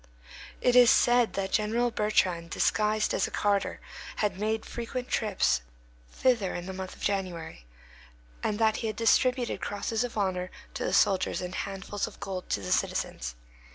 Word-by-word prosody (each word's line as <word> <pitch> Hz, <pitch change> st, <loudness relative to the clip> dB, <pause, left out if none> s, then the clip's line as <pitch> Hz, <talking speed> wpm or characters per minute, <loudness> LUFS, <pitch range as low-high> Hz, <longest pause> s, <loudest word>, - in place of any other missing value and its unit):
It 250 Hz, -, +3 dB
was 245 Hz, -1 st, +8 dB
said 240 Hz, -1 st, +4 dB
that 195 Hz, -1 st, -2 dB
General 230 Hz, +3 st, +1 dB
Bertrand, 185 Hz, -6 st, +1 dB
disguised 215 Hz, +4 st, +1 dB
as -, -, +1 dB
a -, -, -7 dB
carter, 200 Hz, -1 st, 0 dB, 0.4 s
had 205 Hz, -3 st, -1 dB
made 220 Hz, +1 st, -1 dB
frequent 245 Hz, +2 st, -5 dB
trips 205 Hz, -, +1 dB, 0.5 s
thither 235 Hz, -8 st, +1 dB
in 175 Hz, -, -5 dB
the 190 Hz, -, -5 dB
month 185 Hz, 0 st, -6 dB
of -, -, -13 dB
January, 175 Hz, -, -3 dB, 0.7 s
and 210 Hz, -, -1 dB
that 220 Hz, -1 st, +3 dB
he 225 Hz, -, -2 dB
had 215 Hz, -, -3 dB
distributed 245 Hz, +2 st, +2 dB
crosses 220 Hz, +3 st, -2 dB
of 245 Hz, -2 st, -5 dB
honor 185 Hz, -3 st, -1 dB, 0.2 s
to -, -, -4 dB
the -, -, -1 dB
soldiers 195 Hz, -1 st, +3 dB
and 180 Hz, 0 st, -5 dB
handfuls 195 Hz, +1 st, -3 dB
of -, -, -12 dB
gold 185 Hz, -2 st, -5 dB
to 100 Hz, -, 0 dB
the 90 Hz, -, -5 dB
citizens. -, -, -1 dB
205 Hz, 165 wpm, -28 LUFS, 185-225 Hz, 0.7 s, was